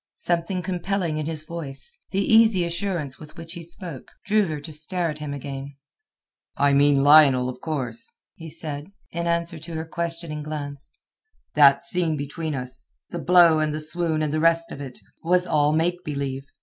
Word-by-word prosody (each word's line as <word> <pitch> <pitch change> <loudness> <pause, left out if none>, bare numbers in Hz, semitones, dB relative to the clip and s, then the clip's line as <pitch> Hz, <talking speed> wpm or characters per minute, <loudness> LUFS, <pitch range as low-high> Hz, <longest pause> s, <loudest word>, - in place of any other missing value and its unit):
Something 180 - 0
compelling 180 -3 -1
in 155 - -3
his 155 -1 -3
voice, 170 - -3
the 195 +1 0
easy 220 -5 +5
assurance 170 -5 -3
with 155 +2 -13
which 165 0 -8
he 170 - -7
spoke, 170 -4 -8 0.2
drew 210 -1 +3
her 155 -2 -3
to 155 +2 -8
stare 165 +2 -2
at 150 - -8
him 150 -1 -5
again. 140 0 -6 0.8
"I 140 0 +3
mean 140 0 +4
Lionel, 140 -4 +7
of 125 0 -8
course," 125 -7 -3 0.2
he 165 -1 -10
said, 155 +1 -6 0.2
in 170 0 -3
answer 170 -1 0
to 160 +2 -8
her 160 0 -3
questioning 165 -2 -4
glance. 145 -2 -6 0.6
"That 140 -1 +6
scene 170 -3 0
between 150 +2 -4
us—the 125 -1 -7
blow 170 -3 +6
and 155 -1 0
the - - -3
swoon 160 0 0
and 150 -1 -1
the 155 - +1
rest 165 +1 +2
of 140 - -7
it—was 165 +7 -2
all 150 -3 +2
make 175 +3 0
believe. 140 -2 -4
155 Hz, 175 wpm, -24 LUFS, 145-170 Hz, 0.8 s, Lionel